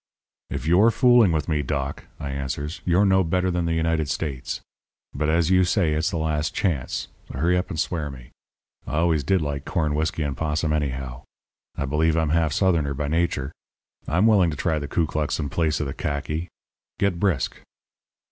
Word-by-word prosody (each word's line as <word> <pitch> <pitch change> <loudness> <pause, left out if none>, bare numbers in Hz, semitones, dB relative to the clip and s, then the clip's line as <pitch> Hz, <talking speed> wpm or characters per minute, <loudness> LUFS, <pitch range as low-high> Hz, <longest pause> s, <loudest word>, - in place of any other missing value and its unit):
"'If 65 - -4
you're 90 +8 +5
fooling 120 -4 +5
with 80 -4 -1
me, 75 -2 +1
Doc,' 70 0 -3
I 70 -1 -4
answers, 70 +3 -4
'you're 90 +3 +4
no 95 -1 +4
better 90 +2 +1
than 85 -1 0
the 85 0 0
United 80 -2 0
States. 70 -5 -3 0.5
But 75 - -1
as 85 +2 +2
you 95 0 +5
say 90 -3 +2
it's 80 +1 +1
the - - -3
last 75 -1 -1
chance, 85 - -1 0.2
hurry 85 +7 +1
up 90 +1 -1
and 80 - -4
swear 80 -3 -1
me. 65 -3 -11 0.6
I - - -3
always 80 -2 +2
did 90 +4 +2
like 70 -2 -3
corn 75 -3 -1
whisky 80 +1 -1
and 70 -2 -2
'possum 75 0 -1
anyhow. 65 -3 -2 0.5
I 70 - -2
believe 80 +3 +1
I'm 80 -2 +1
half 80 -1 +2
Southerner 80 -6 +1
by 75 +1 -2
nature. 80 -4 0 0.6
I'm 90 +8 +2
willing 100 -6 +5
to 75 - -4
try 80 -3 0
the 70 - -5
Klu 80 +4 +1
klux 75 -1 -2
in 75 -2 -2
place 80 +1 0
of 75 - -1
the 70 - -4
khaki. 75 +3 -3 0.5
Get 100 -4 0
brisk.' 90 -10 0
80 Hz, 190 wpm, -24 LUFS, 75-85 Hz, 0.6 s, you're